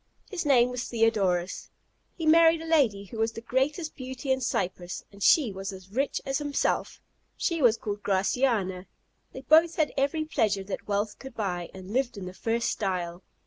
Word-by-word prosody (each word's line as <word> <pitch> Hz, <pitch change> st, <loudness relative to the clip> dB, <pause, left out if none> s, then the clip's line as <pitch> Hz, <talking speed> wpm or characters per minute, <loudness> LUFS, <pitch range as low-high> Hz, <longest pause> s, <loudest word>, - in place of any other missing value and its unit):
His 350 Hz, -6 st, -3 dB
name 250 Hz, -3 st, +5 dB
was 250 Hz, -1 st, -3 dB
Theodorus: 200 Hz, -6 st, 0 dB, 0.5 s
he 325 Hz, -, -4 dB
married 325 Hz, +1 st, +6 dB
a 325 Hz, -, -7 dB
lady 265 Hz, -12 st, +2 dB
who 220 Hz, +3 st, -9 dB
was 225 Hz, +1 st, +1 dB
the -, -, -6 dB
greatest 280 Hz, +7 st, -1 dB
beauty 260 Hz, 0 st, -5 dB
in 260 Hz, 0 st, +1 dB
Cyprus, 180 Hz, -6 st, -3 dB
and 200 Hz, 0 st, -15 dB
she 265 Hz, +1 st, +5 dB
was 195 Hz, 0 st, -5 dB
as 190 Hz, 0 st, -12 dB
rich 270 Hz, +6 st, 0 dB
as 270 Hz, +1 st, -1 dB
himself; 290 Hz, -1 st, -1 dB, 0.4 s
she 335 Hz, -2 st, -1 dB
was 235 Hz, -3 st, +5 dB
called 205 Hz, -1 st, -5 dB
Graciana. 195 Hz, -2 st, 0 dB, 0.4 s
They 260 Hz, -, -8 dB
both 320 Hz, +4 st, +5 dB
had 310 Hz, -2 st, +1 dB
every 285 Hz, +3 st, 0 dB
pleasure 210 Hz, -10 st, 0 dB
that 195 Hz, -, -6 dB
wealth 205 Hz, +1 st, -1 dB
could 265 Hz, -3 st, -10 dB
buy, 180 Hz, -5 st, -3 dB
and 190 Hz, +2 st, -9 dB
lived 255 Hz, -3 st, 0 dB
in 195 Hz, -, -6 dB
the 180 Hz, -, -7 dB
first 230 Hz, +4 st, -1 dB
style. 180 Hz, -3 st, -3 dB
230 Hz, 185 wpm, -27 LUFS, 195-275 Hz, 0.5 s, married